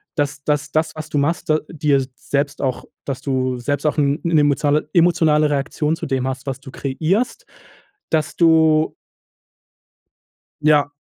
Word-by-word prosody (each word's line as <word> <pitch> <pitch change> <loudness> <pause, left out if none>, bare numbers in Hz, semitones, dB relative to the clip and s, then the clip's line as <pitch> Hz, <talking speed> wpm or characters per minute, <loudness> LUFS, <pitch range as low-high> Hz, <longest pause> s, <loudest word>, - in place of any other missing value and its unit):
dass 145 -2 -2
dass 150 -1 0
das, 160 +1 0
was 155 0 -7
du - - -2
machst 155 +3 0 0.2
dir 145 -4 +1
selbst 140 +2 -2
auch 130 -3 -2 0.2
dass 135 -2 -4
du 130 -2 -1
selbst 145 +4 -2
auch 150 - +1
'n 145 +1 +2
'ne 165 -2 +3
emotio 145 +1 +2
emotionale 165 -3 +4
Reaktion 150 +2 -1
zu 165 - -5
dem 135 -3 -1
hast, 130 0 -4
was 135 -1 -3
du 135 - -11
kreierst, 175 - -1 0.6
dass 160 +1 0
du 160 -2 +4 1.7
Ja. 150 -1 +4
150 Hz, 145 wpm, -20 LUFS, 140-160 Hz, 1.7 s, emotionale